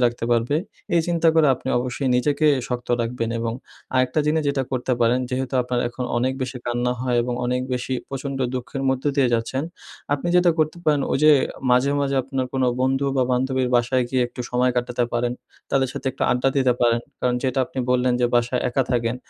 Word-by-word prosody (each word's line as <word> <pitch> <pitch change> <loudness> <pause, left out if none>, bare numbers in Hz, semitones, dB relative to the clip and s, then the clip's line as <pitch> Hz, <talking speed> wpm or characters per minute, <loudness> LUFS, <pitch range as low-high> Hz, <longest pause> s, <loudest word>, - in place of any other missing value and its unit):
রাখতে 120 -1 0
পারবে। 120 +5 +2 0.4
এই 170 - +5
চিন্তা 170 -1 +2
করে 160 -2 +5
আপনি 130 - -8
অবশ্যই 125 +2 -2
নিজেকে 145 +4 +1 0.2
শক্ত 125 -1 -4
রাখবেন 115 0 -2
এবং 115 0 -2 0.4
আরেকটা 130 +3 +2
জিনিস 155 +1 +2
যেটা 140 -1 -1
করতে 130 0 -1
পারেন, 120 +2 +3
যেহেতু 130 +1 -2
আপনার 125 0 -1
এখন 125 +1 -5
অনেক 130 +2 +1
বেশি 125 0 -4
কান্না 120 +1 0
হয় 125 -1 0
এবং 125 0 -2
অনেক 125 +1 0
বেশি 125 +1 -2
প্রচণ্ড 135 0 -4 0.2
দুঃখের 130 +2 -4
মধ্য 130 0 -1
দিয়ে 135 -3 +4
যাচ্ছেন। 115 +4 -1 0.5
আপনি 145 +4 -3
যেটা 175 -1 +5
করতে 155 +1 +1
পারেন, 150 -2 +3
ওই - - +1
যে 155 - +8 0.4
মাঝে, 125 +3 +4
মাঝে 140 -1 0
আপনার 130 0 -3
কোন 135 -1 0 0.2
বন্ধু 135 +2 +1
বা 130 - +3
বান্ধবীর 130 0 0
বাসায় 120 +1 +1
গিয়ে 130 0 +1
একটু 125 - -9
সময় 125 +1 +2
কাটাতে 125 0 0
পারেন। 120 0 0 0.4
তাদের 135 -1 +2
সাথে - - -7
একটু 135 - -6
আড্ডা 125 +2 +2
দিতে 130 -2 +4
পারেন 120 -1 +3 0.2
কারণ, 125 -1 +1
যেটা 130 -1 0
আপনি - - -8
বললেন 125 0 +2
যে, 120 - +4
বাসায় 120 +1 +1
একা 130 +2 +1
থাকেন। 120 -1 0
125 Hz, 200 wpm, -22 LUFS, 120-135 Hz, 0.5 s, যে